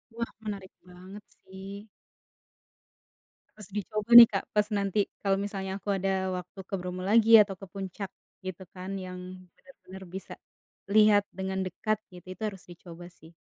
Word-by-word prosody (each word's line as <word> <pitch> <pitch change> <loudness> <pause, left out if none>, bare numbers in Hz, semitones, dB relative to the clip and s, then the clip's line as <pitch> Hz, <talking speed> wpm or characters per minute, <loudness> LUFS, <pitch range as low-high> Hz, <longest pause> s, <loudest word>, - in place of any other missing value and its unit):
Wah, 235 0 -4
menarik 200 -3 -6 0.2
banget 185 +3 -12 0.2
sih. 195 +2 -10 1.7
Harus 210 -2 -10
dicoba 215 +2 -4
nih 235 - +13
Kak, 195 - -1
pas 210 0 +3
nanti 200 +1 0 0.2
kalo 195 -1 +2
misalnya 195 -2 -5
aku 205 - -7
ada 195 +1 -1 0.3
waktu 180 +2 -10
ke - - -13
Bromo 180 0 -5
lagi 225 +2 +4
atau 195 -2 -1
ke - - -7
puncak, 195 0 -6 0.4
gitu 185 0 -6
kan 185 +1 -8 0.2
yang 180 0 -7 0.4
bener-bener 190 -8 -14
bisa, 190 - -7 0.6
lihat 210 -1 +6
dengan 190 0 -3
dekat 215 +3 -2 0.2
gitu 180 0 -13
itu 185 - -24
harus 195 -3 -8
dicoba 175 0 -12
sih. 160 +2 -16
195 Hz, 150 wpm, -28 LUFS, 185-210 Hz, 1.7 s, nih